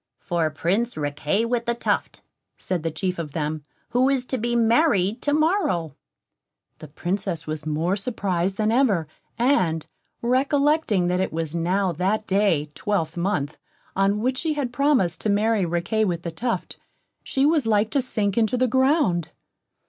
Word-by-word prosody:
"For 170 Hz, -3 st, -1 dB
Prince 190 Hz, +10 st, -1 dB
Riquet 150 Hz, +8 st, -1 dB
with 235 Hz, -1 st, -1 dB
the 235 Hz, -, +1 dB
Tuft," 235 Hz, -, -2 dB, 0.3 s
said 180 Hz, -3 st, -3 dB
the 165 Hz, -, -1 dB
chief 180 Hz, +3 st, -3 dB
of 150 Hz, -4 st, -5 dB
them, 155 Hz, -1 st, -3 dB, 0.3 s
"who 255 Hz, +2 st, +3 dB
is 265 Hz, -2 st, +1 dB
to 260 Hz, 0 st, -3 dB
be 240 Hz, +2 st, -1 dB
married 230 Hz, -, +3 dB
to 290 Hz, -, 0 dB
morrow." 295 Hz, -, +1 dB, 0.8 s
The 155 Hz, -, -9 dB
Princess 175 Hz, +4 st, -3 dB
was 155 Hz, 0 st, -5 dB
more 160 Hz, +5 st, 0 dB
surprised 195 Hz, -4 st, -1 dB
than 215 Hz, 0 st, +1 dB
ever, 220 Hz, -, +2 dB, 0.3 s
and 185 Hz, -, +2 dB, 0.4 s
recollecting 275 Hz, -, +2 dB
that 180 Hz, 0 st, +1 dB
it 190 Hz, -, -1 dB
was 160 Hz, -1 st, -3 dB
now 180 Hz, +3 st, +1 dB
that 190 Hz, +6 st, -1 dB
day 190 Hz, -8 st, +1 dB
twelvemonth 165 Hz, -3 st, -2 dB, 0.4 s
on 195 Hz, +2 st, +2 dB
which 255 Hz, +2 st, 0 dB
she 320 Hz, -2 st, 0 dB
had 265 Hz, -5 st, -2 dB
promised 255 Hz, -, +2 dB
to 215 Hz, -, -1 dB
marry 210 Hz, -1 st, +2 dB
Riquet 175 Hz, +6 st, 0 dB
with 175 Hz, -3 st, -2 dB
the 170 Hz, -, -4 dB
Tuft, 235 Hz, +8 st, -3 dB, 0.4 s
she 270 Hz, +1 st, +1 dB
was 300 Hz, -5 st, +2 dB
like 215 Hz, 0 st, +2 dB
to 280 Hz, -, +2 dB
sink 215 Hz, -4 st, 0 dB
into 225 Hz, +2 st, +1 dB
the 255 Hz, -, +3 dB
ground. 260 Hz, -, +2 dB
200 Hz, 160 wpm, -24 LUFS, 170-245 Hz, 0.8 s, who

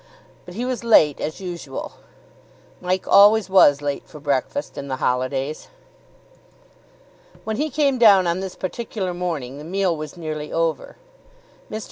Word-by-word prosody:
But 180 Hz, -, -11 dB
he 240 Hz, +4 st, -3 dB
was 255 Hz, -2 st, -3 dB
late, 155 Hz, -11 st, +4 dB
as 155 Hz, -, -4 dB
usual. 175 Hz, -8 st, -6 dB, 0.9 s
Mike 185 Hz, +1 st, -2 dB
always 205 Hz, 0 st, +6 dB
was 145 Hz, -7 st, +5 dB
late 145 Hz, -1 st, -2 dB
for 150 Hz, -, -12 dB
breakfast 145 Hz, -, -2 dB
in 140 Hz, -, -6 dB
the 130 Hz, -, -2 dB
holidays. 130 Hz, +3 st, -2 dB, 1.8 s
When 220 Hz, -1 st, -3 dB
he 305 Hz, +3 st, -1 dB
came 280 Hz, -4 st, +1 dB
down 200 Hz, -5 st, +6 dB
on 170 Hz, +1 st, 0 dB
this 190 Hz, -1 st, -6 dB
particular 190 Hz, -1 st, -4 dB
morning, 155 Hz, -7 st, -4 dB
the -, -, -9 dB
meal 185 Hz, +1 st, 0 dB
was 155 Hz, +2 st, -8 dB
nearly 155 Hz, -2 st, -5 dB
over. 165 Hz, -1 st, -2 dB, 0.7 s
Mr. 215 Hz, -, -4 dB
175 Hz, 145 wpm, -22 LUFS, 150-200 Hz, 1.8 s, always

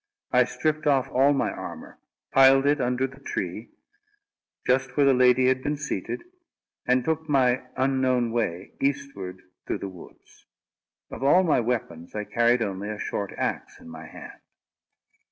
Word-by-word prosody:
I -, -, +5 dB
stripped 155 Hz, 0 st, -2 dB
off 135 Hz, -3 st, +2 dB
all 135 Hz, +3 st, +4 dB
my 140 Hz, -, 0 dB
armour, -, -, -9 dB, 0.3 s
piled 135 Hz, 0 st, +6 dB
it 145 Hz, 0 st, +2 dB
under 125 Hz, +1 st, 0 dB
the 135 Hz, 0 st, -9 dB
tree, 105 Hz, -5 st, -5 dB, 1.0 s
just 130 Hz, 0 st, +1 dB
where 145 Hz, -, +5 dB
the 135 Hz, -, +5 dB
lady 125 Hz, 0 st, +4 dB
had 130 Hz, 0 st, +2 dB
been 145 Hz, +2 st, -2 dB
seated, 150 Hz, -, -4 dB, 0.6 s
and 125 Hz, 0 st, +2 dB
took 160 Hz, 0 st, -2 dB
my 130 Hz, -3 st, +2 dB
unknown 130 Hz, -3 st, +1 dB
way, 100 Hz, -6 st, -2 dB
eastward 135 Hz, -10 st, -3 dB, 0.2 s
through -, -, -1 dB
the 100 Hz, -, -6 dB
woods. 90 Hz, -2 st, -16 dB, 0.6 s
Of -, -, -8 dB
all 145 Hz, +7 st, +5 dB
my 160 Hz, -7 st, +3 dB
weapons, 110 Hz, -9 st, -3 dB
I 105 Hz, -, -2 dB
carried 120 Hz, +2 st, +2 dB
only 100 Hz, 0 st, -4 dB
a 105 Hz, -, -4 dB
short 100 Hz, -1 st, -4 dB
axe -, -, -3 dB
in -, -, -13 dB
my 80 Hz, 0 st, -10 dB
hand. -, -, -12 dB
130 Hz, 155 wpm, -25 LUFS, 110-140 Hz, 1.0 s, piled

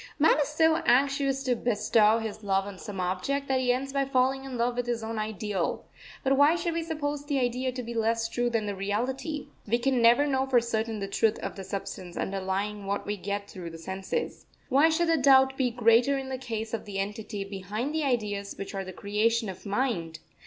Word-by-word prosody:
Man 310 Hz, 0 st, +4 dB
is 285 Hz, -, +1 dB
so 320 Hz, +1 st, +3 dB
anxious 275 Hz, 0 st, +2 dB
to 250 Hz, -2 st, +1 dB
bestow 220 Hz, -1 st, +3 dB
his 220 Hz, -1 st, -5 dB
love 195 Hz, -1 st, +1 dB
on 200 Hz, -2 st, -8 dB
some 205 Hz, -4 st, -7 dB
object, 190 Hz, +11 st, -1 dB
that 265 Hz, -1 st, +2 dB
he 250 Hz, -1 st, +2 dB
ends 270 Hz, +2 st, -2 dB
by 275 Hz, -1 st, +2 dB
falling 265 Hz, 0 st, +1 dB
in 260 Hz, -2 st, -5 dB
love 240 Hz, +1 st, +1 dB
with 245 Hz, 0 st, -2 dB
his 235 Hz, -2 st, -1 dB
own 220 Hz, 0 st, -3 dB
Ideal. 210 Hz, -4 st, -2 dB, 0.4 s
But 270 Hz, 0 st, +3 dB
why 290 Hz, +4 st, +6 dB
should 345 Hz, -1 st, -1 dB
we 335 Hz, -, -1 dB
suppose 295 Hz, -3 st, -3 dB
the 290 Hz, -1 st, -1 dB
idea 255 Hz, 0 st, 0 dB
to 250 Hz, 0 st, -5 dB
be 235 Hz, +1 st, -6 dB
less 225 Hz, 0 st, +1 dB
true 240 Hz, +1 st, 0 dB
than 225 Hz, -2 st, 0 dB
the 205 Hz, -, -2 dB
reality? 250 Hz, -, -3 dB, 0.2 s
We 230 Hz, +3 st, +2 dB
can 250 Hz, 0 st, +1 dB
never 235 Hz, +5 st, +6 dB
know 265 Hz, -2 st, 0 dB
for 255 Hz, -2 st, +5 dB
certain 225 Hz, -1 st, -2 dB
the 195 Hz, -, -2 dB
truth 215 Hz, +2 st, +1 dB
of -, -, -4 dB
the 195 Hz, -, -7 dB
substance 185 Hz, -2 st, -6 dB
underlying 195 Hz, +1 st, -2 dB
what 200 Hz, +1 st, -2 dB
we 205 Hz, -, -2 dB
get 200 Hz, +1 st, -4 dB
through 180 Hz, -4 st, -8 dB
the 165 Hz, -, -9 dB
senses. 190 Hz, -, -4 dB, 0.2 s
Why 285 Hz, +4 st, +5 dB
should 340 Hz, +2 st, +1 dB
the 330 Hz, 0 st, +3 dB
doubt 265 Hz, -1 st, +5 dB
be 260 Hz, -2 st, +1 dB
greater 240 Hz, +3 st, +4 dB
in 265 Hz, -1 st, -5 dB
the 260 Hz, -1 st, -4 dB
case 225 Hz, -3 st, -4 dB
of 230 Hz, -, -3 dB
the 200 Hz, -2 st, -6 dB
entity 210 Hz, +1 st, -3 dB
behind 200 Hz, +7 st, -4 dB
the 315 Hz, -1 st, 0 dB
ideas 210 Hz, -7 st, -1 dB
which 195 Hz, -, -6 dB
are 195 Hz, -1 st, -3 dB
the 185 Hz, -, -7 dB
creation 215 Hz, +3 st, 0 dB
of 190 Hz, +2 st, -8 dB
mind? 200 Hz, -8 st, -1 dB
230 Hz, 220 wpm, -28 LUFS, 205-270 Hz, 0.4 s, why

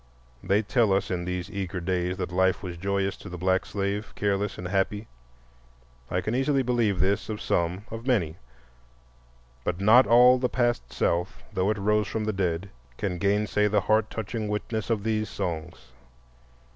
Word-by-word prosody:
They 100 Hz, +3 st, +2 dB
tell 110 Hz, -1 st, +2 dB
us 95 Hz, 0 st, 0 dB
in 90 Hz, -1 st, -2 dB
these 90 Hz, +2 st, -4 dB
eager 95 Hz, -2 st, -3 dB
days 90 Hz, +1 st, -1 dB
that 90 Hz, -1 st, -3 dB
life 95 Hz, +2 st, +2 dB
was 90 Hz, -2 st, -5 dB
joyous 100 Hz, +2 st, -1 dB
to 100 Hz, -, -10 dB
the 90 Hz, -, -6 dB
black 95 Hz, +1 st, +1 dB
slave, 100 Hz, +1 st, -3 dB
careless 100 Hz, 0 st, -1 dB
and 90 Hz, -, -5 dB
happy. 100 Hz, +3 st, -1 dB, 1.0 s
I 90 Hz, -, 0 dB
can 110 Hz, -, -2 dB
easily 135 Hz, +1 st, +2 dB
believe 115 Hz, -6 st, +1 dB
this 100 Hz, +4 st, +1 dB
of 105 Hz, -1 st, -3 dB
some, 90 Hz, +4 st, -1 dB
of 115 Hz, +3 st, -7 dB
many. 90 Hz, -, +1 dB, 1.3 s
But 90 Hz, +5 st, -2 dB
not 110 Hz, +6 st, +6 dB
all 125 Hz, +2 st, +7 dB
the 125 Hz, 0 st, 0 dB
past 120 Hz, -1 st, 0 dB
South, 85 Hz, +2 st, -1 dB
though 95 Hz, 0 st, +1 dB
it 110 Hz, -, 0 dB
rose 105 Hz, +1 st, +1 dB
from 110 Hz, -, -2 dB
the 110 Hz, 0 st, -1 dB
dead, 95 Hz, -1 st, -2 dB, 0.3 s
can 90 Hz, -3 st, -2 dB
gainsay 105 Hz, +2 st, +2 dB
the 105 Hz, 0 st, +2 dB
heart 110 Hz, +1 st, +2 dB
touching 110 Hz, 0 st, -4 dB
witness 105 Hz, +1 st, -3 dB
of 110 Hz, -3 st, 0 dB
these 110 Hz, -1 st, -1 dB
songs. 85 Hz, -7 st, -5 dB
100 Hz, 170 wpm, -26 LUFS, 90-110 Hz, 1.3 s, all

